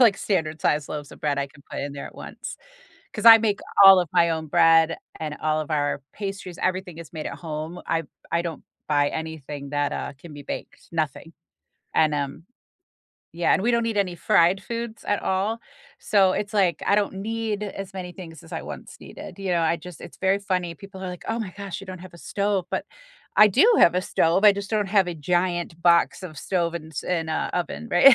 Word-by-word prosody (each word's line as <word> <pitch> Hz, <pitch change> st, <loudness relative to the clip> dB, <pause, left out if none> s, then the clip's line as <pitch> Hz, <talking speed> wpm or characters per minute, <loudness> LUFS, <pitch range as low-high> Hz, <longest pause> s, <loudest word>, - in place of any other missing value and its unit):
like, 225 Hz, -5 st, +6 dB
standard 160 Hz, -7 st, -1 dB
size 150 Hz, -1 st, +1 dB
loaves 145 Hz, -2 st, -6 dB
of -, -, -14 dB
bread 145 Hz, -2 st, 0 dB
I 140 Hz, -, 0 dB
can 140 Hz, +1 st, -19 dB
put -, -, -4 dB
in 140 Hz, 0 st, -4 dB
there 140 Hz, -, -6 dB
at -, -, -12 dB
once, -, -, -8 dB, 0.6 s
'cause -, -, -5 dB
I 225 Hz, 0 st, +12 dB
make 210 Hz, -2 st, 0 dB, 0.2 s
all 195 Hz, -1 st, +10 dB
of 175 Hz, -, -2 dB
my 170 Hz, -2 st, +4 dB
own 160 Hz, -1 st, -2 dB
bread 165 Hz, 0 st, +5 dB, 0.2 s
and 150 Hz, -1 st, -4 dB
all 155 Hz, 0 st, +1 dB
of 155 Hz, -, -6 dB
our 145 Hz, -2 st, 0 dB
pastries- 195 Hz, -3 st, -6 dB
everything 185 Hz, -2 st, -1 dB
is 165 Hz, 0 st, -10 dB
made 155 Hz, -2 st, -5 dB
at -, -, -5 dB
home. 160 Hz, +1 st, -5 dB
I 165 Hz, 0 st, 0 dB, 0.3 s
I 170 Hz, 0 st, +2 dB
don't 165 Hz, -4 st, -5 dB, 0.3 s
buy 145 Hz, -1 st, +3 dB
anything 150 Hz, -3 st, -6 dB
that, 145 Hz, -1 st, 0 dB
uh, -, -, -4 dB
can 165 Hz, 0 st, -12 dB
be 145 Hz, -, -9 dB
baked, -, -, -7 dB
nothing, 160 Hz, +1 st, -3 dB, 0.6 s
and, 155 Hz, -1 st, +3 dB
um 145 Hz, +3 st, -3 dB, 0.9 s
Yeah, 170 Hz, -, +3 dB
and -, -, +2 dB
we 240 Hz, -, +2 dB
don't 235 Hz, -1 st, +2 dB
eat 225 Hz, -2 st, -2 dB
any 185 Hz, -3 st, +1 dB
fried 170 Hz, +2 st, +3 dB
foods 235 Hz, 0 st, -5 dB
at 205 Hz, -, 0 dB
all, 195 Hz, +4 st, 0 dB, 0.4 s
so 195 Hz, -3 st, +3 dB
it's, 205 Hz, +1 st, -3 dB
like, 185 Hz, -4 st, +2 dB
I 200 Hz, -, +4 dB
don't 205 Hz, -2 st, +1 dB
need 215 Hz, +1 st, -3 dB
as 195 Hz, -1 st, -6 dB
many 180 Hz, -2 st, -6 dB
things 165 Hz, -5 st, -11 dB
as -, -, -14 dB
I -, -, -4 dB
once -, -, -9 dB
needed, -, -, -10 dB
you 195 Hz, -, -2 dB
know? 170 Hz, -1 st, +2 dB
I 165 Hz, +1 st, +2 dB
just 175 Hz, 0 st, -11 dB
it's -, -, -11 dB
very 195 Hz, +1 st, +2 dB
funny, 180 Hz, -4 st, -2 dB
people 195 Hz, -1 st, -11 dB
are 185 Hz, -, -3 dB
like, 180 Hz, -2 st, -8 dB
"Oh 225 Hz, +1 st, -1 dB
my 205 Hz, -, -4 dB
gosh, 200 Hz, -3 st, -6 dB
you 195 Hz, -, -11 dB
don't 185 Hz, -1 st, -6 dB
have 180 Hz, 0 st, -12 dB
a 170 Hz, -, -13 dB
stove," 200 Hz, -2 st, -1 dB
but -, -, -2 dB, 0.5 s
I 210 Hz, 0 st, +8 dB
do 420 Hz, -, +5 dB
have 175 Hz, +1 st, +6 dB
a -, -, +3 dB
stove, 180 Hz, +3 st, +2 dB
I 205 Hz, -, +9 dB
just 200 Hz, +1 st, -6 dB
don't 210 Hz, -2 st, +1 dB
have 195 Hz, -2 st, +3 dB
a 175 Hz, -, -3 dB
giant 175 Hz, +1 st, -1 dB
box 170 Hz, +2 st, +4 dB
of 155 Hz, -6 st, -8 dB
stove 170 Hz, -1 st, -1 dB
and 160 Hz, -1 st, -7 dB
s 145 Hz, -, -4 dB
and 165 Hz, -3 st, -1 dB
a 160 Hz, -, -1 dB
oven, 180 Hz, +6 st, -3 dB
right? 260 Hz, +10 st, +8 dB
175 Hz, 225 wpm, -24 LUFS, 160-195 Hz, 0.9 s, I